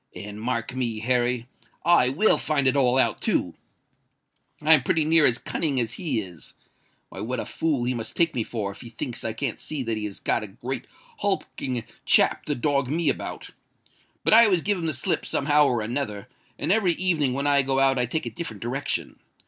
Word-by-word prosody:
And, 105 +1 -8
mark 115 0 -2
me, 120 -4 -2
Harry—I 125 +5 +1
will 180 +12 +3
find 140 -3 +1
it 130 - +5
all 130 -2 +3
out 130 - +1
too! - - 0 1.1
I'm 155 -1 +5
pretty 155 +4 +1
near 160 -1 +5
as 120 - +4
cunning 145 -3 -2
as 115 -1 -1
he 150 -11 -2
is! 90 -5 -9 0.5
Why—what 120 +3 -4
a - - -3
fool 150 -6 -1
he 125 +1 0
must 115 -2 -6
take 170 -1 +2
me 120 - -1
for, 105 -3 -3
if - - -13
he 120 - -10
thinks 115 +1 -5
I 110 - -2
can't 115 +1 -3
see 150 -4 -4
that 115 -2 -2
he 105 - -3
has 100 -2 -6
got - - 0
a - - -5
great - - -6 0.3
hulking 125 -3 -2 0.2
chap - - +3
to 145 - -1
dog 140 0 0
me 155 +2 +1
about. - - -4 0.7
But - - +3
I 230 +1 +9
always 185 -6 +2
give 200 0 0
him 165 - -2
the 155 - -1
slip 130 - -1
somehow 150 +1 +3
or 120 -4 0
another; 110 -3 -4 0.3
and 155 - -1
every 195 -4 +3
evening 165 -8 +1
when 140 +2 -2
I 145 -1 +4
go 135 0 0
out 135 -1 +3
I 125 - +1
take 155 +6 -2
a - - -4
different 115 - -7
direction. 135 +4 -3
130 Hz, 205 wpm, -25 LUFS, 120-155 Hz, 1.1 s, I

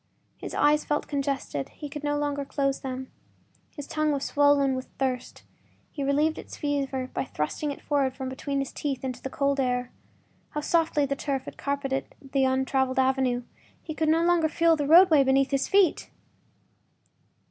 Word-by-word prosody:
His - - -6
eyes 300 +1 +3
felt 295 0 -1
congested; 275 - -2
he 295 - -8
could 295 +1 -8
no 290 0 0
longer 290 -1 -1
close 275 0 -1
them. 260 0 -6 0.6
His 290 - -8
tongue 310 0 0
was 280 -1 -1
swollen 285 -2 +3
with 260 0 -4
thirst; 255 -2 -3 0.5
he 285 - -4
relieved 295 +3 +1
its - - -10
fever 275 -3 -2
by - - -1
thrusting 260 - -3
it 280 - -6
forward 275 -3 0
from 265 -1 -5
between 275 +2 -3
his 275 -1 -2
teeth 275 -3 -3
into 255 -2 -4
the 265 - -4
cold 280 +1 0
air. 250 -1 0 0.6
How 300 - -1
softly 320 -2 +2
the 275 0 -2
turf 275 -2 -3
had - - -8
carpeted 280 -1 -3
the 270 -1 0
untraveled 265 0 +1
avenue—he 260 +3 -1
could 315 0 0
no 325 +1 +3
longer 340 -2 +3
feel 330 +1 +3
the 290 -2 -2
roadway 325 -2 +7
beneath 270 +1 +2
his 275 -1 +1
feet! 390 -5 +3
280 Hz, 170 wpm, -27 LUFS, 265-295 Hz, 0.6 s, roadway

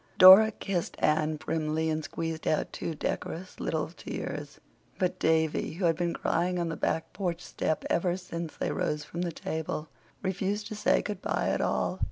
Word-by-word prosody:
Dora 190 +4 +11
kissed 195 -5 -3
Anne 155 0 +2
primly 155 +1 -1
and 155 0 -1
squeezed 160 +2 -4
out 155 - 0
two 165 - -3
decorous 175 +4 -4
little 160 -1 -1
tears; 150 -3 -6 0.4
but 185 0 0
Davy, 160 -1 +1
who 175 +3 -2
had 165 -1 +4
been 170 +1 -1
crying 180 +2 0
on 170 -1 -1
the 165 - -3
back 160 +1 -1
porch 175 -4 -2
step 155 -2 -2
ever 175 +1 +1
since 170 -3 -6
they - - -1
rose 150 0 -1
from 170 +3 -5
the 175 -1 -1
table, 160 -1 -4 0.3
refused 195 +2 -1
to 215 - -5
say 210 - +2
good 205 -2 -4
bye - - 0
at - - 0
all. - - 0
165 Hz, 180 wpm, -29 LUFS, 155-185 Hz, 0.4 s, Dora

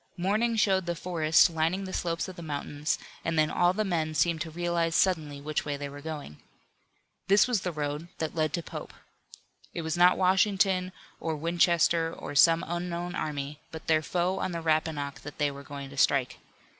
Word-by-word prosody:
Morning 215 +6 +1
showed 190 -4 +2
the 175 - -1
forest 165 -2 +4
lining 165 +4 0
the 190 -1 -6
slopes 170 0 -1
of 185 - -8
the 175 - -9
mountains 150 -1 -2 0.3
and 165 -1 -1
then 155 0 +3
all 175 0 +3
the 215 +3 -1
men 160 -4 -1
seemed 165 0 +2
to 165 - -3
realize 170 0 -1
suddenly 155 -7 +1
which 150 +1 -2
way 145 -1 -3
they 140 0 -5
were 145 +1 -10
going. 150 - -7 0.9
This 200 +3 +5
was 240 -6 +1
the 180 - -2
road 150 +1 -3
that 160 -1 -3
led 155 -2 0
to 170 - -2
Pope. - - -8 0.8
It 170 - -3
was 160 0 -2
not 180 +1 +5
Washington, 190 0 +2 0.3
or 160 -1 -2
Winchester, 170 0 +2
or - - -7
some 165 +4 +5
unknown 175 0 -3
army, 145 -2 -4
but 160 - -8
their 155 -1 +3
foe 180 +4 -1
on 185 - -2
the 170 - -3
Rappahannock 155 -3 -1
that 145 - -10
they 145 -1 +1
were 140 0 -9
going 140 -1 -8
to 140 - -11
strike. 135 -2 +2
165 Hz, 195 wpm, -28 LUFS, 150-180 Hz, 0.9 s, This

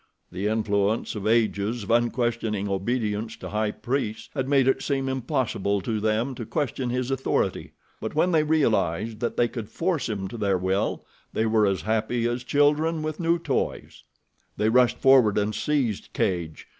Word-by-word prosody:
The 95 +3 -2
influence 105 0 0
of 105 -1 -4
ages 110 0 +1
of 100 - -4
unquestioning 120 -3 0
obedience 105 +2 -2
to - - -7
high 105 0 0
priests 120 0 -3
had 130 0 -2
made 135 -2 +4
it 135 0 +2
seem 135 -2 -1
impossible 130 -6 -1
to 110 +2 -2
them 110 +5 0
to 120 - -6
question 135 -4 -2
his 125 +1 -1
authority; 135 0 -1 0.3
but 110 - -5
when 175 +4 +3
they 160 -2 +4
realized 115 - +1
that 120 - -2
they 120 - +4
could 115 -3 -7
force 165 -1 -1
him 100 -3 -3
to 120 - -7
their 100 -3 +2
will 95 +2 -1 0.3
they 110 - +1
were 110 -2 +3
as 95 -5 -1
happy 110 +3 0
as 120 +1 -2
children 150 +4 +2
with 155 0 -4
new 170 0 +2
toys. 170 - -3 0.5
They 110 - +2
rushed 125 +1 +4
forward 130 -6 +5
and 105 +1 +1
seized 130 -9 -1
Cadj. 85 -4 -2
115 Hz, 170 wpm, -25 LUFS, 105-135 Hz, 0.5 s, forward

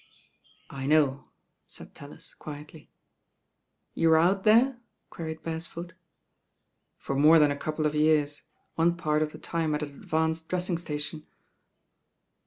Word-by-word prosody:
"I 135 0 -5
know," 145 -3 +2 0.4
said - - -11
TaUis - - -13
quietly. 150 +1 -10 1.1
I'You 165 - +3
were 160 - +6
out 190 +4 +2
there?" 235 +4 +4 0.3
queried 160 -1 -6
Beresford. 165 +1 -6 1.1
tor 135 - -2
more 155 +4 +6
than 150 -2 +5
a - - -1
couple 155 +2 -3
of 150 - +1
years, 150 -1 +2 0.3
one 170 +1 +1
part 155 -3 0
of 155 -1 -1
tlie - - -13
tune 160 -2 -1
at 150 - -3
an 150 - -5
advanced 160 +3 -2
dressing 180 -1 -1
station." 150 -1 -5
160 Hz, 135 wpm, -27 LUFS, 150-165 Hz, 1.1 s, were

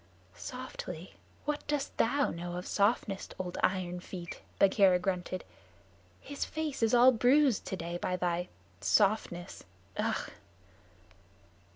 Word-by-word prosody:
"Softly! - - -7 0.3
What 295 0 -2
dost 295 -2 -1
thou 275 +5 +2
know 175 +1 -5
of 180 - -4
softness, 200 -1 +1
old 180 -1 -4
Iron 180 -1 0
feet?" 175 -1 -8 0.2
Bagheera 195 -2 +5
grunted. 180 0 -2 0.8
"His 285 - -4
face 310 -4 -3
is 225 +1 +4
all 245 +2 +8
bruised 255 +1 +4
today 170 -1 -4
by 180 - 0
thy 175 0 -1 0.3
softness. 185 - +1 0.3
Ugh." - - -1
195 Hz, 110 wpm, -31 LUFS, 180-250 Hz, 0.8 s, all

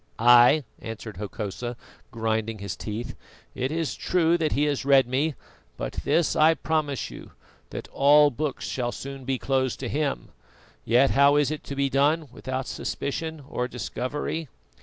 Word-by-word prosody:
"Ay!" 120 +5 +6 0.2
answered 115 -3 -7
Hokosa, 105 +4 -5 0.3
grinding 110 -2 -2
his 100 -6 -5
teeth, 110 +7 -5 0.4
"it 130 +2 -2
is 165 -1 -1
true 170 -2 +2
that 160 -3 0
he 145 - +1
has 145 -2 0
read 135 -1 +5
me; 135 +5 0 0.4
but - - -4
this 170 -2 +2
I 160 +1 +5
promise 155 -5 -1
you, - - -11 0.4
that - - -7
all 145 +1 +5
books 145 +2 -3
shall 120 -2 -2
soon 135 0 -8
be 135 0 0
closed 130 -1 0
to 130 - -3
him. 130 - -2 0.5
Yet 125 +4 +4
how 140 +1 +5
is 145 0 +2
it 155 - -5
to 140 - -5
be 140 0 +1
done 145 +3 +2
without 130 +1 -4
suspicion 160 +3 -4
or 125 -3 -2
discovery? 145 +6 -4
135 Hz, 160 wpm, -26 LUFS, 120-150 Hz, 0.5 s, Ay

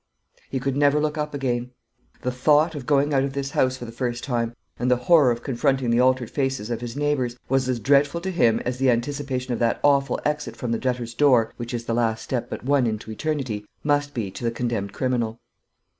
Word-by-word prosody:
He 135 - -2
could 135 +1 -1
never 145 +1 +4
look 150 0 0
up 150 -1 -3
again. 125 -3 -1 0.5
The 125 - 0
thought 150 +6 +3
of 140 -5 -7
going 145 0 +3
out 135 -1 +3
of 135 0 -2
this 140 0 -3
house 130 0 +1
for 125 - -7
the 115 - -8
first 120 0 -3
time, 120 -3 -1 0.2
and 125 - 0
the 125 - +5
horror 135 +3 +5
of 120 0 -1
confronting 135 -1 +1
the 120 - +3
altered 130 -2 +2
faces 135 -5 -2
of 115 -1 -2
his 120 -1 -5
neighbours, 140 -5 0
was 135 -1 +1
as 125 -2 0
dreadful 140 +6 +3
to 190 +2 -3
him 115 -11 +3
as 125 +1 -2
the 135 -1 +3
anticipation 130 +1 -1
of - - -3
that 115 -1 +1
awful 140 -2 +3
exit 150 0 -1
from 120 - -4
the 115 - 0
Debtor's 125 -2 -2
Door, 120 -4 +3
which 120 0 -5
is 120 -1 -4
the 115 - -1
last 115 -1 0
step 120 -2 -3
but - - -6
one 135 -2 +3
into 110 0 -4
eternity, 130 -5 -2 0.2
must 145 -1 +1
be 105 -6 -2
to 110 - -9
the 115 - +2
condemned 115 -4 -2
criminal. 120 -2 -1
125 Hz, 225 wpm, -24 LUFS, 120-140 Hz, 0.5 s, the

